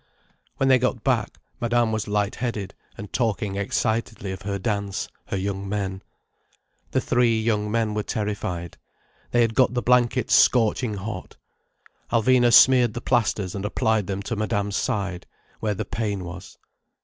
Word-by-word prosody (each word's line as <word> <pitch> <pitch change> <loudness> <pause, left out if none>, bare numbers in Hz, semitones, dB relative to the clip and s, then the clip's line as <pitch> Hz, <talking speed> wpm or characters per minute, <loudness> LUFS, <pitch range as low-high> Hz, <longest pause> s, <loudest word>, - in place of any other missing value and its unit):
When 135 - +1
they 130 -1 +5
got 125 -2 -1
back, 120 -6 0 0.2
Madame 120 -1 +1
was 110 0 -2
light 105 0 0
headed, 115 -6 -4 0.2
and 100 0 -9
talking 105 -4 -1
excitedly 110 0 -1
of 95 - -7
her 100 0 -3
dance, 100 -1 -2 0.2
her - - -2
young 100 0 -3
men. 95 -2 -3 0.9
The - - +1
three 120 -2 +2
young 105 -2 0
men 110 -1 0
were 105 - -1
terrified. 100 -6 -4 0.5
They 120 - +2
had 115 -1 +2
got 125 0 +3
the 120 - 0
blankets 125 0 +2
scorching 115 -1 +3
hot. 100 -1 -7 0.7
Alvina 120 +1 +4
smeared 125 -2 +6
the - - -2
plasters 110 -7 0
and 100 - -4
applied 105 -1 0
them 100 0 -3
to 115 - -3
Madame's 100 -1 -1
side, 95 -4 -2 0.3
where 105 -2 -1
the - - -3
pain 105 -4 -3
was. 90 +1 -9
105 Hz, 155 wpm, -24 LUFS, 100-120 Hz, 0.9 s, smeared